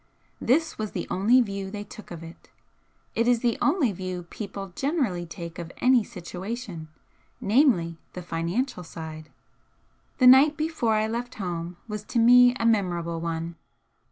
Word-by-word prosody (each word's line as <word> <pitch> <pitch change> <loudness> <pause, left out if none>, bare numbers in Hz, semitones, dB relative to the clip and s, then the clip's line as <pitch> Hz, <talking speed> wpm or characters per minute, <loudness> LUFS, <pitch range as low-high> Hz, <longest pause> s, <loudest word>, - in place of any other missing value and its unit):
This 305 +4 +1
was 215 -1 -3
the - - -3
only 225 +7 +4
view 200 -4 -3
they 205 +1 -6
took 210 +1 -12
of 170 -1 -8
it. 165 +1 -13 0.6
It 230 +1 +1
is 245 -2 +3
the 240 -2 +2
only 285 - +3
view 185 -1 -5
people 195 -3 -7
generally 260 - -1
take 170 0 -8
of 170 0 -6
any 250 -2 +4
situation, 190 -2 -7 0.5
namely, 200 - +2
the 180 - -7
financial 180 +7 -2
side. 160 -2 -8 0.9
The 255 - +3
night 275 +4 +7
before 310 -8 0
I 215 0 +2
left 240 +3 -4
home 175 -4 -4
was 210 -1 -5
to - - -3
me 245 +1 +7
a 230 - -2
memorable 175 -7 +1
one. 165 0 -4
205 Hz, 155 wpm, -26 LUFS, 175-245 Hz, 0.9 s, night